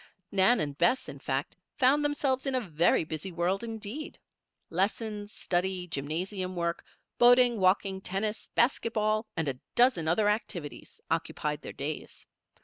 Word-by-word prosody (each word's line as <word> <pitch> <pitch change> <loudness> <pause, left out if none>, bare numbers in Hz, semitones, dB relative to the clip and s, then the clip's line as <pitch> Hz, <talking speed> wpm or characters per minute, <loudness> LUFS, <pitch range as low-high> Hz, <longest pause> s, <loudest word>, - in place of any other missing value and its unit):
Nan 200 +5 +4
and 145 -2 -2
Bess, 175 - +2
in 140 - -8
fact, 135 +1 -2 0.2
found 285 +2 +4
themselves 285 -2 0
in 270 - 0
a - - +3
very 165 +1 +3
busy 160 +4 -4
world 180 +4 0
indeed. 225 +5 -6 0.5
Lessons, 205 +3 -1
study, 180 -1 -1
gymnasium 180 +5 -3
work, 170 -1 -2 0.4
boating, 245 -1 +6
walking, 190 +1 +2
tennis, 210 +4 -3
basket 235 -1 +2
ball, 215 +1 +1
and 160 - 0
a 130 -2 -2 0.2
dozen 240 -10 +4
other 205 +6 +3
activities, 190 -8 -3
occupied 150 0 -1
their - - -7
days. 150 +2 -5
195 Hz, 140 wpm, -29 LUFS, 170-230 Hz, 0.5 s, boating